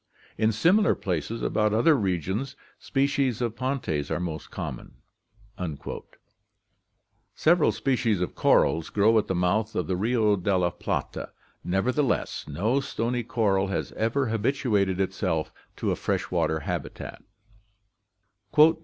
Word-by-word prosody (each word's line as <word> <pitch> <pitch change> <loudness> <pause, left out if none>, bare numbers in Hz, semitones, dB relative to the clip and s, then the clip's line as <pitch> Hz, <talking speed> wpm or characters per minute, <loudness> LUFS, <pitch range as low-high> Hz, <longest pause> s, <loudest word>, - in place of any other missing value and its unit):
In 110 +1 +2
similar 180 - +4
places 90 +5 -3
about 105 0 +1
other 135 +8 +5
regions 95 - -1 0.2
species 135 -3 0
of 120 -2 -2
Pontes 130 - -2
are - - -1
most 85 -3 -5
common.' - - -6 2.4
Several 165 0 +4
species 120 -7 0
of 90 - -2
corals 80 0 +3
grow 105 +2 +3
at - - -3
the 95 - -1
mouth 100 +5 +1
of 90 - 0
the 90 - -1
Rio 110 +1 +2
della 90 -1 +1
Plata." - - -3 0.3
Nevertheless, 125 +9 0
no 105 - +1
stony 120 -2 -2
coral 105 -5 +1
has 95 - -3
ever 115 +3 0
habituated 110 -5 +1
itself 90 -4 -1 0.2
to - - -1
a - - +1
fresh - - -2
water 80 0 +1
habitat. - - -5
110 Hz, 120 wpm, -26 LUFS, 95-125 Hz, 2.4 s, other